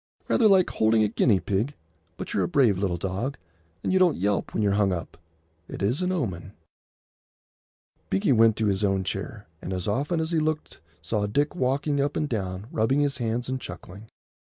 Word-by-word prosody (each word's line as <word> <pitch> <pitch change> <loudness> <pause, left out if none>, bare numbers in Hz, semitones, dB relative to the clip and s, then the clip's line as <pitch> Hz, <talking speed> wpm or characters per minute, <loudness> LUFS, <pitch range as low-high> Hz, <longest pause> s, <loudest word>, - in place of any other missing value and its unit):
"Rather 225 - +4
like 190 -3 +4
holding 110 0 +3
a - - +3
guinea 105 -1 +2
pig; 110 +11 -1 0.4
but - - -6
you're - - +1
a - - 0
brave 130 - +3
little 95 -3 0
dog, 100 - -3 0.5
and - - 0
you 190 - +4
don't 180 -4 +4
yelp 100 +2 0
when 110 - -1
you're 100 - +2
hung 100 -1 +2
up. 85 -2 -4 0.5
It - - -6
is 120 - +1
an 180 0 0
omen." 100 - -3 1.6
Binkie 95 +7 +1
went 115 -2 +5
to 110 - -1
his 100 0 0
own 95 -1 +1
chair, 100 +2 -5 0.2
and 90 - -6
as 90 -2 -3
often 145 +11 0
as 160 +1 -2
he 165 - +2
looked 155 0 -2 0.2
saw 105 +4 -1
Dick 145 +8 0
walking 140 0 0
up 145 +1 -1
and 150 - 0
down, 95 -5 -3
rubbing 110 +6 +1
his 140 -2 0
hands 120 +1 -2
and 130 0 -3
chuckling. 95 +3 -10
110 Hz, 195 wpm, -26 LUFS, 100-145 Hz, 1.6 s, went